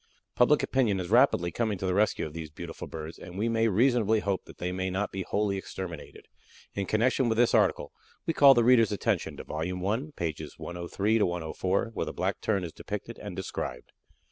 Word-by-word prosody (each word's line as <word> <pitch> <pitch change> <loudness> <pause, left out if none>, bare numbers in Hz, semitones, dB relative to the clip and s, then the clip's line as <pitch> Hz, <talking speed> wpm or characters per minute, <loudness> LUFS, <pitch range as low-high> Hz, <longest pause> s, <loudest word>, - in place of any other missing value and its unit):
Public 145 +5 +4
opinion 115 -8 +1
is 90 +1 -5
rapidly 115 -8 +4
coming 110 +1 -1
to 95 - -4
the 90 - +1
rescue 105 +3 +2
of 75 - -8
these 80 -1 -6
beautiful 80 +2 -8
birds, 80 0 -7
and 90 - -9
we 110 +3 0
may 115 0 +2
reasonably 110 0 +3
hope 100 -3 -2
that - - -14
they 90 +1 -3
may 95 +1 -2
not 95 +3 -2
be 95 - -4
wholly 100 +1 0
exterminated. 95 -4 -7 0.5
In 100 -1 -3
connection 120 +3 +2
with 110 - 0
this 120 0 +4
article, - - +2 0.3
we 165 - 0
call 140 -3 +8
the 120 - +4
reader's 115 -3 +5
attention 100 - -1
to - - -7
Vol. 75 - -5
I, 90 +7 -1
pages 80 -3 -4
103 95 +6 -1
104, 90 +4 -1
where - - -2
the - - -4
Black - - -2
Tern 100 -4 0
is 85 - -6
depicted - - -6
and - - -7
described. 60 0 -5
100 Hz, 200 wpm, -28 LUFS, 90-115 Hz, 0.5 s, call